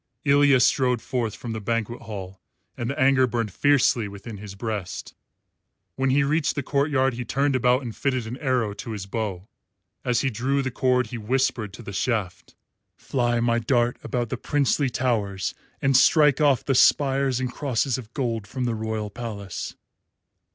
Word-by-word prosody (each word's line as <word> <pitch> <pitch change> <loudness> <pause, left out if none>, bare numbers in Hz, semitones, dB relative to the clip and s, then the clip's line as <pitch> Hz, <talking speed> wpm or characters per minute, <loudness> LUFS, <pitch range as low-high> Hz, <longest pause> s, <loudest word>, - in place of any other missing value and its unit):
Ilya 140 -1 +5
strode 125 -1 +3
forth 115 -3 -2
from 115 -2 -6
the 110 - -5
banquet 115 +2 -2
hall 95 -5 -8 0.3
and 120 - -3
the 140 +3 -4
anger 130 -1 +4
burned 115 -4 -2
fiercely 135 -5 +3
within 100 +2 -9
his 100 -1 -9
breast. 105 -3 -5 0.8
When 135 0 0
he 140 +2 +3
reached 150 +2 +1
the 140 - -2
courtyard 140 -2 +1
he 120 +1 -4
turned 140 +3 0
about 125 +1 +3
and 115 -3 -6
fitted 130 -4 -1
an 115 +2 -5
arrow 125 -7 0
to 115 +3 -6
his 100 -3 -5
bow. 100 -2 -4 0.6
As 125 -1 +1
he 135 - 0
drew 135 +5 0
the 130 - -2
cord 125 0 +1
he 120 - -4
whispered 120 -2 0
to 120 - -10
the 100 - -7
shaft, 100 -4 -2 0.4
"Fly, 120 -2 0
my 120 0 +2
dart, 120 0 +1
about 120 -2 -2
the 130 - -3
princely 140 +1 +1
towers 110 -6 -1 0.3
and 135 -1 +3
strike 150 +2 +5
off 135 -4 +3
the 135 - +1
spires 135 -1 +3
and 125 -1 -3
crosses 135 -2 0
of 115 -2 -11
gold 115 -7 -2
from 130 +2 -4
the 120 -1 0
royal 110 -1 -3
palace." 105 -5 -6
125 Hz, 175 wpm, -24 LUFS, 110-135 Hz, 0.8 s, Ilya